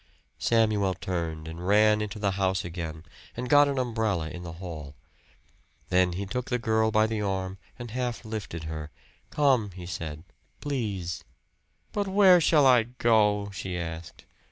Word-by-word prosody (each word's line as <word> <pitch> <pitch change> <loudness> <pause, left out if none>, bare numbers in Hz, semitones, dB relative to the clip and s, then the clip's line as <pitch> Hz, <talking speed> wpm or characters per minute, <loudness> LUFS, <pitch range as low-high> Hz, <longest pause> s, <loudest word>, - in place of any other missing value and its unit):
Samuel 105 -5 +2
turned 80 -3 -4
and 85 +3 -6
ran 105 +1 +5
into 105 0 -4
the 100 -2 0
house 95 -1 0
again 80 -2 -6 0.3
and 125 +1 -3
got 145 +2 +6
an 140 -1 -1
umbrella 110 -10 -1
in 90 - -7
the 85 -2 -7
hall. 80 -5 -8 0.9
Then 90 0 +3
he 100 +3 -3
took 125 +6 -4
the 125 - +1
girl 110 -1 +1
by 110 0 +3
the 110 -1 -2
arm 95 -1 -2 0.2
and 120 -3 -7
half 120 -1 -3
lifted 105 -7 -5
her. 80 -1 -5 0.4
"Come," 130 -8 +2
he 90 -1 -9
said. 80 -3 -6 0.4
"Please." 105 - -3 0.7
"But 205 -1 -1
where 190 -2 +6
shall 150 -3 +4
I 125 -3 +7
go?" 110 -4 +2
she 95 -2 -4
asked. 85 -1 -7
100 Hz, 155 wpm, -27 LUFS, 85-115 Hz, 0.9 s, I